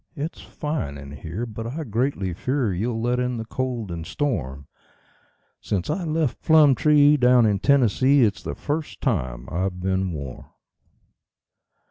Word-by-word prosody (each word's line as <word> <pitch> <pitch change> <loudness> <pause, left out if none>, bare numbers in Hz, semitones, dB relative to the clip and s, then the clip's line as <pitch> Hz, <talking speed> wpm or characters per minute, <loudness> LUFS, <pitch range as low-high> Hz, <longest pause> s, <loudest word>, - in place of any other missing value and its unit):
It's 155 +2 -5
fine 150 - -4
in 70 0 -10
here, 85 +10 -5
but 115 0 -6
I 150 +7 -4
greatly 115 - -1
fear 125 - -1
you'll 115 +5 -2
let 120 +2 0
in 125 -1 -1
the 115 - -5
cold 120 -4 -3
and 85 -1 -5
storm 75 - -3 0.9
Since 100 +4 -2
I 175 +3 -2
left 155 -4 -1
Plumtree, 150 -1 +5
down 125 -2 +5
in 100 -2 +2
Tennessee, 135 +2 +4
it's 105 -2 +1
the - - -5
first 150 +1 -4
time 65 - -2
I've 90 +1 -2
been 95 0 -1
warm." 70 -5 -7
115 Hz, 145 wpm, -24 LUFS, 90-140 Hz, 0.9 s, Plumtree